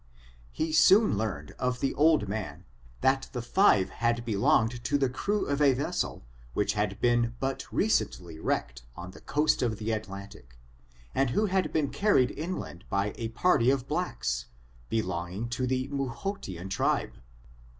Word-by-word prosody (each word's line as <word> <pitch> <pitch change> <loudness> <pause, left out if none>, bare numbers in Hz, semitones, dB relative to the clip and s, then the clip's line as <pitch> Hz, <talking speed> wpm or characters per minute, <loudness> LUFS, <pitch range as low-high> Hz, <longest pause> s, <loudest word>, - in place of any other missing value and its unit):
He 160 - -2
soon 195 - +6
learned 100 -9 -3
of 125 0 -1
the 135 - 0
old 155 -6 +3
man, 95 -5 -5 0.4
that 135 0 +2
the 125 - -3
five 120 - +4
men - - -15
had 120 0 0
belonged 120 +1 +2
to 145 - +2
the 135 -3 +1
crew 205 +10 -1
of 140 +1 -1
a 140 -3 +5
ves 135 - -3
sel - - -2 0.3
which 100 - +1
had 105 -1 -1 0.4
but 135 0 -3
recently 90 - 0
been - - -12
wrecked - - -1
on 90 +1 -8
the - - -14
coast 150 +1 +1
of 115 -4 0
the 110 +1 -3
Atlantic, 100 - -7 0.6
and 135 -2 +2
who 210 - +1
had 190 -2 0
been 150 -3 0
carried 200 -12 +3
in 175 +4 -4
land 85 +1 -8
by 100 +1 0
a 115 - -3
party 120 +1 +3
of 135 -1 0
blacks, 65 - -2 0.4
belonging 95 0 -2
to 125 +2 -1
the 130 +1 0
Mtihotian 130 - -4
tribe. - - 0
120 Hz, 165 wpm, -28 LUFS, 100-145 Hz, 0.6 s, soon